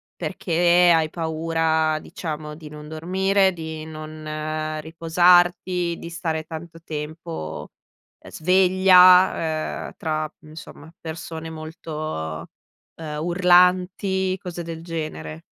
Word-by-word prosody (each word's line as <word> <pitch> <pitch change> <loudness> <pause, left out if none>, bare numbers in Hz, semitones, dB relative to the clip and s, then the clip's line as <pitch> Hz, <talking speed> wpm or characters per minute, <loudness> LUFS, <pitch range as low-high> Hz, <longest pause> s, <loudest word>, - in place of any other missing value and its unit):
Perché 175 +1 +3
hai 155 -1 +1
paura, 160 -1 0
diciamo, 150 -2 -6
di 155 -1 -11
non 150 0 -10
dormire, 190 +4 +1
di 160 -2 -7
non 155 0 -5
riposarti, 175 +2 +2
di 170 - -8
stare 165 -2 -3
tanto 165 +1 -9
tempo, 155 - -6 0.5
ehm, - - -14
sveglia, 180 -2 +4
uhm, - - -9
tra, 155 -1 -2
mhmm, 155 0 -11
insomma 160 0 -12
persone 160 0 -7
molto, 155 - -6 0.5
uhm, 155 -2 -6
urlanti, 180 +2 +3
cose 175 -1 -6
del 165 -1 -7
genere? 155 - -6
160 Hz, 105 wpm, -23 LUFS, 155-175 Hz, 0.5 s, sveglia